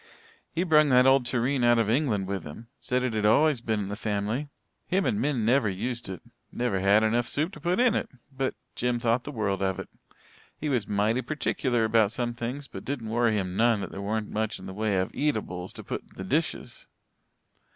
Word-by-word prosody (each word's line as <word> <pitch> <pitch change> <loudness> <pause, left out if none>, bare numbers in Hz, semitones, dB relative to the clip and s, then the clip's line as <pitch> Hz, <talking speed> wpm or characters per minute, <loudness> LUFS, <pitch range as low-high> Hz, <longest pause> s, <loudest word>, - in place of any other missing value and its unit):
He 170 - 0
brung 155 -4 +5
that 125 -1 +6
old 135 -2 +5
tureen 125 +2 +1
out 120 0 +5
from 115 -2 +2
England 115 -7 +1
with 95 -2 -3
him 95 +11 -10
said 125 0 -1
it'd 110 -4 -1
always 135 +5 +4
been 110 -2 -1
in 100 - -4
the 105 - -3
family. 110 +6 -2 0.4
Him 190 +1 +1
and 210 - +1
Min 130 -7 0
never 120 -2 +3
used 120 +4 -3
it 95 -3 -7 0.3
never 120 -6 -1
had 100 +3 +4
enough 115 +2 +1
soup 155 +8 0
to - - -10
put 180 +3 0
in 245 -2 +4
it - - -1 0.3
but 130 0 -1 0.2
Jim 120 0 0
thought 120 +1 +1
the 145 - -5
world 100 -6 -1
of 95 -1 0
it. - - -7 0.7
He 150 - -3
was 120 -7 0
mighty 105 +4 +1
perticuler 125 -3 0
about 110 -2 +3
some 120 0 -2
things 125 +4 -5
but - - -9
didn't 125 -5 -4
worry 115 -1 +2
him 90 -2 -2
none 115 0 +3
that - - -5
there 100 - -6
weren't 105 +1 -2
much 110 0 -1
in - - -11
the 95 - -7
way 105 -1 0
o' 95 - 0
eatables 105 -11 -2
to - - -9
put - - -4
in - - -28
the 95 - -6
dishes." 150 - -2
115 Hz, 215 wpm, -27 LUFS, 105-130 Hz, 0.7 s, that